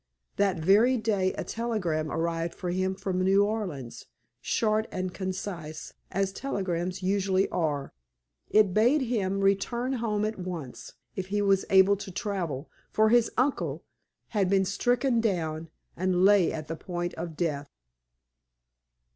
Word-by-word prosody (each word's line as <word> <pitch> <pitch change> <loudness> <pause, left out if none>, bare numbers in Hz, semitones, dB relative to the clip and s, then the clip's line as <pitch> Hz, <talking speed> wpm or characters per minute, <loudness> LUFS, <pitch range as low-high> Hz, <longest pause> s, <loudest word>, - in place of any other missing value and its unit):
That 195 -3 +2
very 205 +10 +4
day 205 -4 +1
a - - -4
telegram 180 -10 -2
arrived 165 0 -1
for 180 -2 -3
him 185 +1 0
from 190 -1 -2
New 195 +2 +4
Orleans, 180 - -4 0.3
short 220 0 +1
and 185 -1 -3
concise, 180 -5 -5 0.2
as 195 0 -1
telegrams 185 -6 -3
usually 195 0 +2
are. 150 -5 -2 0.6
It 210 -3 +4
bade 245 +9 +4
him 200 -6 -1
return 235 +6 +1
home 215 -4 0
at 215 -1 -3
once, 175 -8 -6 0.2
if 190 -1 -4
he 205 +1 0
was 195 -1 +3
able 195 +1 +6
to 200 0 -7
travel; 175 - -3 0.2
for 215 0 +3
his 235 0 +4
"uncle" 260 +3 0 0.5
had 200 -4 +1
been 195 0 +3
stricken 240 +5 +1
down, 165 -6 -1 0.3
and 185 +1 +2
lay 200 -3 +5
at 155 -2 -5
the 165 - -4
point 175 +1 -4
of 165 -1 -6
death. 145 -4 -2
190 Hz, 140 wpm, -28 LUFS, 175-210 Hz, 0.6 s, able